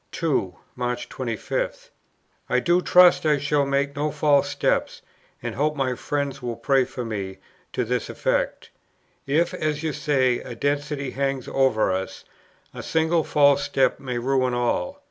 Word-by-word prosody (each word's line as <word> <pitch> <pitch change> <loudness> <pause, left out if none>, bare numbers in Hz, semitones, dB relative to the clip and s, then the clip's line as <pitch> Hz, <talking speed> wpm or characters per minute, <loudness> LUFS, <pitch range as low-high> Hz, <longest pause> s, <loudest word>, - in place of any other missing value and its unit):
2. 135 - -1 0.2
March 125 0 -3
25. - - -4 0.6
"I - - +3
do 175 +1 +2
trust 180 0 +6
I 150 -2 +3
shall 145 0 +1
make 140 0 0
no 150 +2 0
false 145 -1 +2
step, - - +1 0.5
and - - -3
hope 150 +4 0
my 135 -3 0
friends 140 +2 -3
will 120 -1 -3
pray 135 0 +2
for 125 -1 -6
me 100 -4 -4 0.3
to 125 - -1
this 125 0 -2
effect. - - -1 0.6
If, 165 +5 +1
as 150 0 -2
you 155 -2 -1
say, 135 -4 +1
a 120 - -8
destiny 145 +1 -2
hangs 135 -2 -2
over 130 -7 +2
us, 95 +1 -4 0.5
a - - -7
single 160 0 +1
false 145 -2 +4
step 135 - +1
may 125 -3 -4
ruin 130 0 +1
all. 120 - -1
140 Hz, 155 wpm, -24 LUFS, 125-150 Hz, 0.6 s, trust